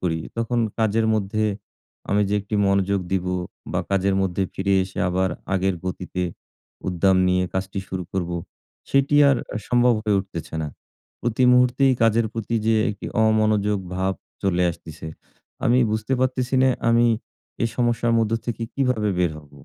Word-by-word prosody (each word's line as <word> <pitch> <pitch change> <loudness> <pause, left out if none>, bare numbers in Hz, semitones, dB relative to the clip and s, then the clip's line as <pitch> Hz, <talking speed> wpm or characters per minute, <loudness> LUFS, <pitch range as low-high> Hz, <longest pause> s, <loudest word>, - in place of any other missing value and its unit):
করি, 80 -3 -1 0.2
তখন 115 +1 -1 0.2
কাজের 110 0 +2
মধ্যে 110 +1 0 0.7
আমি 105 +1 +3
যে 100 - 0
১ 100 - -6
টি 105 - +1
মনোযোগ 100 0 +2
দিব 95 -1 0 0.5
বা - - +1
কাজের 100 0 +2
মধ্যে 95 0 0
ফিরে 100 +1 +1
এসে 95 - -10
আবার 95 +1 +1 0.2
আগের 95 0 +1
গতিতে 90 0 -4 0.7
উদ্দাম 95 +1 +3
নিয়ে 90 0 +2
কাজটি 95 +1 -2
শুরু 95 -1 -4
করব, 90 -2 -2 0.6
সেটি 140 +1 +3
আর 140 - +4 0.2
আ - - -1
সম্ভব 120 0 +4
হয়ে 105 -2 +2
উঠতেছে 95 -4 -8
না। 75 - -3 0.5
প্রতি 120 +2 +1
মুহূর্তেই 125 +2 +4
কাজের 115 0 +3
প্রতি 115 0 -3
যে 115 - +4 0.2
একটি 105 - -7 0.2
অমনোযোগ 110 -2 +2 0.2
ভাব 95 +1 0 0.3
চলে 90 -2 +1
আসতেছে। 80 -1 -10 0.6
আমি 120 +2 +4
বুঝতে 110 +4 -2
পারতেছি 130 0 0
না 130 - +5 0.2
আমি 115 +1 +4 0.6
এই 115 - +2
সমস্যার 120 -1 +1
মধ্য 110 -1 +1
থেকে 115 -1 -3
কীভাবে 125 -6 +1
বের 90 -3 +2
হব? 75 -2 -16
105 Hz, 160 wpm, -23 LUFS, 95-115 Hz, 0.7 s, না